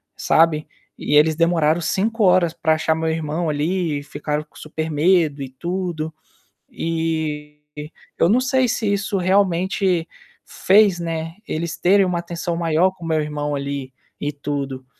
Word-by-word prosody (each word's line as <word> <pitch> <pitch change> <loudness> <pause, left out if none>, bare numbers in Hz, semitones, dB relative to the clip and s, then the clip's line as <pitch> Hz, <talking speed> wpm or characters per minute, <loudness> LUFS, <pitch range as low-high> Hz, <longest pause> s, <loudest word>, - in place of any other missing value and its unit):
sabe, 160 -2 +2 0.3
e 150 - -1
eles 155 +1 +5
demoraram 165 0 +2
5 215 +7 0
horas 180 -3 +4
para 160 - +1
achar 160 0 +1
meu 160 0 -1
irmão 160 +1 -2
ali 155 +1 -1
e - - -10
ficaram 150 +1 -3
com 150 - -32
super 155 +1 -5
medo 155 -2 +2
e 135 - -7
tudo. 170 +2 -4 0.6
Eh, 160 -2 -3 0.6
eu 170 - +3
não 230 +5 +4
sei 260 0 +2
se 215 -2 0
isso 200 0 -1
realmente 185 -1 +1 0.4
fez, 195 -2 +3
né, 165 -1 -4
eles 165 +1 -3
terem 195 +2 +4
uma 180 -1 -1
atenção 170 0 -4
maior 165 +2 +2
com 180 -3 -11
meu 160 -1 +1
irmão 150 -1 -3
ali, 140 -2 -4 0.3
em 145 - 0
tudo. 140 -2 -5
165 Hz, 150 wpm, -21 LUFS, 150-180 Hz, 0.6 s, eles